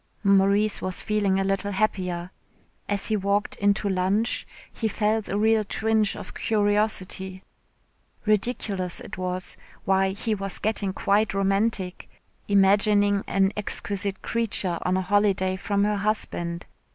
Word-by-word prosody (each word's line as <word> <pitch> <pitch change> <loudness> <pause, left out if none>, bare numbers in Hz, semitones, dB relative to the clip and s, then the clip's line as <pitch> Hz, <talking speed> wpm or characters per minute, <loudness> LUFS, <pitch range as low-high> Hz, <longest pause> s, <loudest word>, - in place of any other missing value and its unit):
Maurice 200 +1 +3
was 185 -1 -2
feeling 205 -3 +1
a - - +1
little 195 +1 -1
happier. 185 -3 -1 0.6
As 205 -1 +1
he 220 - +1
walked 200 +1 0
into 205 +1 +1
lunch 195 +4 0 0.3
he 225 - -1
felt 215 0 0
a 200 - -1
real 220 +1 +3
twinge 220 0 0
of - - -9
curiosity. 205 -3 0 0.8
Ridiculous 205 -4 0
it - - -9
was 185 0 -3 0.3
why 190 0 +3
he 200 +3 -2
was 195 -2 -3
getting 210 -2 -1
quite 200 +2 +1
romantic, 195 -1 0 0.4
imagining 205 0 +4
an 195 0 +2
exquisite 200 -1 -3
creature 205 -7 -1
on 185 +1 +1
a 190 - -1
holiday 195 -1 +2
from 200 +1 0
her 210 0 +1
husband. 175 -5 -2
200 Hz, 130 wpm, -25 LUFS, 190-210 Hz, 0.8 s, imagining